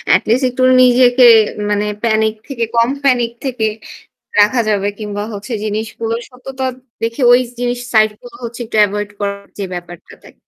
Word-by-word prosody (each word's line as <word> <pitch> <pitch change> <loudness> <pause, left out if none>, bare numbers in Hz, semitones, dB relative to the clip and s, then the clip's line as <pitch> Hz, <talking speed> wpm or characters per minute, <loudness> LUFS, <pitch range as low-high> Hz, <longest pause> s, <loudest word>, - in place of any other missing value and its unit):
At least 245 +5 +1
একটু 255 +1 -2 0.2
নিজেকে 250 0 +5 0.4
মানে 205 0 0 0.2
প্যানিক 220 -1 +2
থেকে 250 -5 -3
কম 230 +1 +3
প্যানিক 245 -3 +2
থেকে 235 -4 -1 0.7
রাখা 225 +4 +4
যাবে 200 -1 0
কিংবা 205 -1 -4
হচ্ছে 205 +4 -6
জিনিসগুলো 220 +2 -3
সত্যতা 260 +1 -7 0.4
দেখে 230 +4 -3
ওই 245 - +7 0.2
জিনিস 245 0 -1
সাইড 215 0 +5
গুলো 245 -1 -13
হচ্ছে 235 +1 -7
একটু 220 - -4
এভয়েড 205 +1 -4
করার 200 0 -4
যে 200 - -3
ব্যাপারটা 175 -1 -9
থাকে। - - -16
230 Hz, 155 wpm, -16 LUFS, 210-245 Hz, 0.7 s, ওই